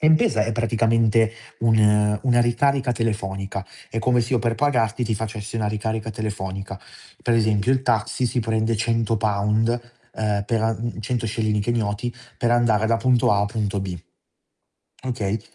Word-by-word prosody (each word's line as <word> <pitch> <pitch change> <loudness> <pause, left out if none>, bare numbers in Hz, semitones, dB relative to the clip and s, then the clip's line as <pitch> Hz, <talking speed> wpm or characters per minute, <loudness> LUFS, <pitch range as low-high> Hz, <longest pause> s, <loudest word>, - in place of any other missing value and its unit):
M-Pesa 155 -8 +4
è 115 - -2
praticamente 115 0 +2 0.3
un 105 -2 +3
una 120 -2 +3
ricarica 135 +2 +2
telefonica, 100 -4 -3 0.2
è 115 - -3
come 125 +1 +3
se 115 +3 -2
io 125 - +4
per 115 -1 0
pagarti 125 -5 +1
ti 110 -1 0
facessi 110 0 -5
una 105 -2 0
ricarica 110 +1 -3
telefonica. 100 -2 -5 0.4
Per 120 - +2
esempio 110 +1 +2
il 130 -1 +1
taxi 115 +1 0
si 120 +1 -1
prende 110 0 0
100£ 110 -1 +1 0.5
ehm, 105 -2 0
per 115 +1 0
a 110 0 +2
mhmm, 115 +1 -5
100KSh 110 0 -1 0.2
per 120 - 0
andare 115 -3 +3
da 115 0 +3
punto 125 +1 +3
A 100 - +2
a 100 - +1
punto 105 -2 -2
B. 95 -2 -4 1.1
Okay, 115 -5 -2
110 Hz, 150 wpm, -23 LUFS, 105-120 Hz, 1.1 s, M-Pesa